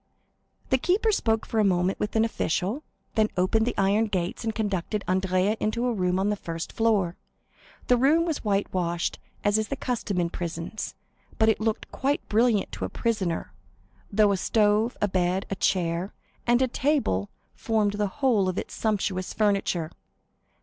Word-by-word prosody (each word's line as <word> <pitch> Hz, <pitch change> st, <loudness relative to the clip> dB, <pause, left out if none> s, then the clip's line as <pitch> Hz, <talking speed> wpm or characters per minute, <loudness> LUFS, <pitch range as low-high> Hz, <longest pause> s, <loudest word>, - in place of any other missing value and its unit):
The 260 Hz, -, +4 dB
keeper 405 Hz, -, +2 dB
spoke 225 Hz, -, +1 dB
for 225 Hz, -, -1 dB
a -, -, +5 dB
moment 185 Hz, -1 st, +1 dB
with 210 Hz, -, -2 dB
an 220 Hz, 0 st, +4 dB
official, 205 Hz, -, -1 dB, 0.3 s
then 215 Hz, -2 st, +2 dB
opened 220 Hz, +5 st, +2 dB
the 245 Hz, -, -2 dB
iron 200 Hz, +3 st, +3 dB
gates 180 Hz, -1 st, -2 dB
and 225 Hz, -1 st, -2 dB
conducted 205 Hz, -1 st, -1 dB
Andrea 185 Hz, +2 st, +1 dB
to 225 Hz, +3 st, -1 dB
a 245 Hz, -, +1 dB
room 180 Hz, -3 st, 0 dB
on 195 Hz, +2 st, +1 dB
the -, -, +1 dB
first 165 Hz, -4 st, -6 dB
floor. 205 Hz, -6 st, +1 dB, 0.7 s
The 250 Hz, -, +4 dB
room 300 Hz, +7 st, +4 dB
was 325 Hz, -3 st, -2 dB
whitewashed, 185 Hz, -4 st, -1 dB, 0.2 s
as 205 Hz, +1 st, +3 dB
is 215 Hz, -, -1 dB
the 275 Hz, -, -2 dB
custom 235 Hz, -8 st, -2 dB
in 170 Hz, -1 st, 0 dB
prisons, 170 Hz, +4 st, -5 dB, 0.4 s
but 220 Hz, 0 st, +4 dB
it 220 Hz, -, +2 dB
looked 220 Hz, 0 st, -2 dB
quite 280 Hz, +2 st, -1 dB
brilliant 225 Hz, -1 st, +2 dB
to -, -, -4 dB
a -, -, -4 dB
prisoner, 185 Hz, -, -2 dB, 0.6 s
though 210 Hz, 0 st, +4 dB
a 195 Hz, -, +1 dB
stove, 215 Hz, +3 st, +2 dB
a 205 Hz, -, +3 dB
bed, 185 Hz, 0 st, 0 dB
a -, -, 0 dB
chair, 180 Hz, -1 st, 0 dB, 0.3 s
and 240 Hz, +2 st, +4 dB
a -, -, +2 dB
table 255 Hz, -, 0 dB, 0.2 s
formed 215 Hz, -3 st, 0 dB
the 205 Hz, 0 st, 0 dB
whole 210 Hz, -3 st, +1 dB
of 185 Hz, -, -3 dB
its -, -, -4 dB
sumptuous 195 Hz, -4 st, -1 dB
furniture. 195 Hz, -6 st, +1 dB
205 Hz, 170 wpm, -26 LUFS, 185-225 Hz, 0.7 s, a